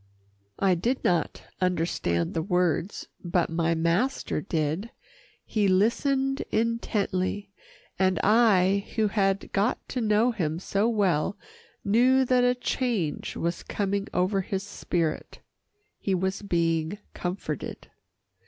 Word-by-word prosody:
I 195 -1 +3
did 235 +10 -1
not 170 -3 0 0.2
understand 165 - 0
the 165 - 0
words, 180 0 0 0.2
but 175 -1 0
my 165 0 +1
master 170 - 0
did. 160 +5 -2 0.6
He 210 -2 +1
listened 265 +8 +2
intently, 205 -4 -1 0.5
and 185 -3 +2
I, 200 -3 +4
who 215 -2 +2
had 195 -1 0
got 200 +1 +2
to 250 - -2
know 220 +2 +3
him 165 -8 -2
so 200 +5 0
well, 195 -5 +1 0.5
knew 255 +6 +4
that 250 0 +3
a 245 0 +3
change 235 - -2
was 170 +1 -2
coming 200 0 -2
over 185 +2 +1
his 190 +1 -3
spirit. 170 -5 -3 0.6
He 195 - 0
was 190 +1 -1
being 165 -2 0 0.2
comforted. 175 -5 -5
195 Hz, 115 wpm, -27 LUFS, 170-220 Hz, 0.6 s, I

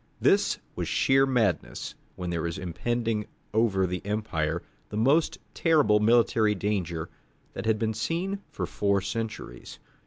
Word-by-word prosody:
This - - +3 0.2
was - - -2
sheer 135 0 +3
madness, 115 -8 0 0.2
when 90 -1 -4
there 85 -2 -1
was 85 0 -3
impending 110 +4 -2 0.3
over 105 -4 +3
the 90 0 -3
empire 85 -6 -1 0.3
the 105 - -5
most 140 +8 +3 0.2
terrible 150 -11 +4
military 110 -1 +4
danger 90 -5 -2 0.5
that 95 - -5
had 110 -1 +3
been 110 0 0
seen 185 - -2
for - - -3
four 100 -1 +1
centuries. 110 - -5
105 Hz, 135 wpm, -27 LUFS, 90-120 Hz, 0.5 s, terrible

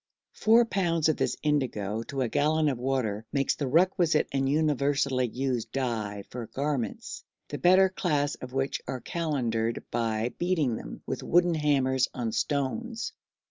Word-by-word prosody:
Four 230 +2 +5
pounds 170 -7 +1
of 155 - +1
this - - 0
indigo 115 -8 0
to 135 -1 -3
a 125 - +1
gallon 150 +4 +2
of 130 -4 -3
water 125 -5 -1
makes 135 -2 +1
the 140 - -3
requisite 170 +1 +3
and 135 -1 0
universally 140 -3 +1
used 125 -1 -2
dye 110 -6 -2
for 120 -2 -6
garments, 135 -5 -3 0.3
the - - -5
better 185 +2 +6
class 150 -6 0
of 125 - -8
which 135 +1 -1
are 130 - -3
calendered 120 -8 -1
by 115 0 -1
beating 160 -9 +1
them - - -8
with - - -3
wooden 175 0 +3
hammers 135 -4 +2
on 120 -3 -2
stones. 190 - -2
140 Hz, 150 wpm, -28 LUFS, 125-155 Hz, 0.3 s, better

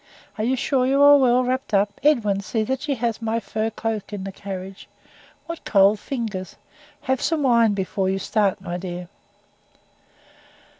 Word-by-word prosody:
"Are - - 0
you 255 +4 +1
sure 255 0 +1
you 275 +1 +2
are 285 0 +9
well 250 -1 +4
wrapped 255 -3 -1
up? 200 +1 +1
Edwin, 220 -10 +2
see 220 +2 -2
that 265 +4 -2
she 290 -2 -1
has 235 -1 -2
my 225 0 -1
fur 220 -1 -3
cloak 220 -2 -4
in 205 -2 -5
the 195 - -5
carriage. 190 0 -8 0.6
What 335 -1 -7
cold 200 0 +4
fingers! 210 -9 -5 0.5
Have 265 0 -1
some 320 -3 0
wine 235 -5 +4
before 190 0 -1
you 190 - 0
start, 205 0 0
my 175 -2 -4
dear." 180 -1 -6
220 Hz, 165 wpm, -23 LUFS, 195-255 Hz, 0.6 s, are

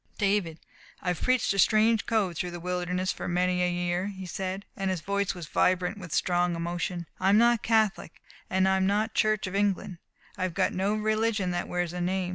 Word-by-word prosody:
"David, 195 -6 0 0.4
I've 180 -2 -1
preached 255 -5 +2
a 195 - -2
strange 220 +2 +4
code 205 -6 +1
through 180 - -2
the 175 0 -7
wilderness 180 +1 -1
for - - -6
many 180 +1 +1
a 180 - +3
long 175 - -1
year," 175 +1 -1
he 190 -2 -7
said, 190 +2 -4
and 195 -2 -2
his 185 -3 -2
voice 200 +1 -1
was 175 -2 -7
vibrant 180 +5 +1
with 180 -4 -9
a - - -1
strong 175 -1 +1
emotion. 175 +1 -3
"I'm 195 +3 +4
not 235 0 +4
Catholic 220 -6 +1 0.3
and 190 0 +2
I'm 190 0 +2
not 210 +2 0
Church 215 -1 +1
of 185 - -5
England. 195 -3 -1 0.4
I've 185 -3 -2
got - - +1
no 195 +3 0
religion 215 -3 0
that 175 - -2
wears 175 -1 -2
a 180 - -4
name. 185 0 -1
185 Hz, 205 wpm, -28 LUFS, 180-205 Hz, 0.4 s, strange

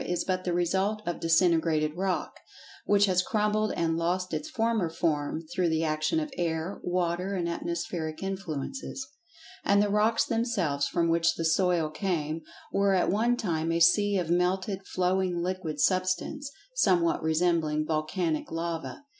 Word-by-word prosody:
is 175 -1 0
but 185 -1 -1
the 180 - 0
result 190 +5 0
of 175 - -3
disintegrated 165 -2 +2
rock, 185 0 -2 0.5
which 205 0 +5
has 185 -2 +2
crumbled 215 -2 0
and 165 -1 0
lost 180 +2 -1
its 310 - -3
former 225 - 0
form 160 -1 -1
through 175 -1 +1
the 160 0 +1
action 155 - 0
of 305 -3 -4
air, 165 +2 -2
water 180 +2 -1
and 175 -2 -1
atmospheric 170 -1 -3
influences. 195 - -4 0.6
And 200 0 +4
the 205 0 +3
rocks 210 +2 +2
themselves, 195 -12 0
from 170 -1 0
which 165 0 +2
the 165 - -2
"soil" 170 -1 +2
came, 160 -4 -2 0.3
were 200 0 +3
at 180 - +2
one 235 +5 +2
time 165 -8 -1
a 165 - +1
sea 200 +4 +4
of 170 -3 -1
melted, 185 +2 0
flowing 185 -1 0
liquid 180 -5 -3
Substance, 185 - 0 0.2
somewhat 175 - +2
resembling 160 -1 +1
volcanic 155 +1 -1
lava. 165 - -4
180 Hz, 150 wpm, -28 LUFS, 165-195 Hz, 0.6 s, which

